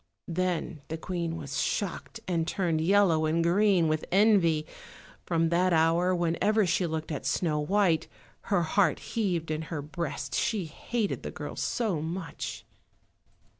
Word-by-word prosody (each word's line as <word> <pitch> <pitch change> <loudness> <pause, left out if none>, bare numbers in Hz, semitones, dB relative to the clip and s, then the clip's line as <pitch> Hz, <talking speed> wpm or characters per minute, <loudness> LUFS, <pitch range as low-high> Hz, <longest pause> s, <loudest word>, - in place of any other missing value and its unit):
Then 180 -4 -1
the 160 - -4
Queen 170 -1 -3
was 140 -3 -3
shocked, 210 +3 -3
and 165 -3 0
turned 170 -5 0
yellow 170 -3 +4
and 165 +2 +1
green 185 0 +3
with 155 0 0
envy. 185 -6 +4 0.6
From 165 -1 +2
that 180 +2 +2
hour, 165 +3 +3
whenever 175 +5 +2
she 180 0 +1
looked 160 0 -4
at 150 - -3
Snow 155 -4 0
white, 170 -1 +2 0.4
her 195 -4 +2
heart 190 +5 +2 0.2
heaved 180 -8 0
in 155 0 -1
her 150 -4 -3
breast, 145 -3 -4
she 200 - 0
hated 210 +7 -3
the - - -5
girl - - -7
so 210 -10 -1
much. 165 +1 -5
170 Hz, 145 wpm, -28 LUFS, 160-190 Hz, 0.6 s, yellow